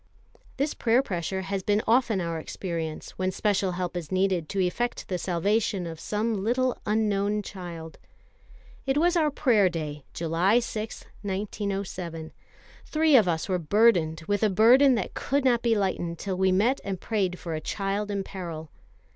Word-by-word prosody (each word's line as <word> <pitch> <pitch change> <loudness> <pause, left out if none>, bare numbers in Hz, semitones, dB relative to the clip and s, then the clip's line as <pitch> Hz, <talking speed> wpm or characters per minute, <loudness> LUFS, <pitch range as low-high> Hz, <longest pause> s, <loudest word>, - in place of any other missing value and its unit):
This 285 +3 0
prayer 240 +3 +2
pressure 190 - -3
has 195 0 -2
been 205 +3 +1
often 230 -3 +3
our 170 -1 -2
experience 165 -2 -5
when 185 0 +1
special 195 -2 0
help 180 0 -3
is 170 -4 -5
needed 185 -4 +1
to 200 - -2
effect 190 +7 -1
the 180 -2 -1
salvation 190 +2 0
of 165 -2 -7
some 210 0 -1
little 250 +3 +1
unknown 210 -1 +1
child. 170 -5 -8 0.9
It 270 +1 +2
was 350 +3 +3
our 315 -3 +3
Prayer 230 -9 +3
day, 150 -4 -5
July 170 +6 +2
6, 225 -2 -3 0.2
1907. 195 -5 -4 0.5
Three 310 -1 +3
of 220 -7 +6
us 165 -2 -1
were 185 -2 0
burdened 170 -3 +3
with 205 +2 0
a 215 - +4
burden 245 +7 +6
that 215 - -3
could 280 0 -1
not 240 -2 +3
be 230 -1 +2
lightened 175 -4 -1
till 190 +2 -3
we 190 0 +2
met 225 +9 +2
and 195 -2 -4
prayed 190 -5 -1
for 170 -2 -5
a 155 - -3
child 200 +3 -2
in 200 -1 -2
peril. 165 -5 -7
195 Hz, 165 wpm, -27 LUFS, 175-225 Hz, 0.9 s, of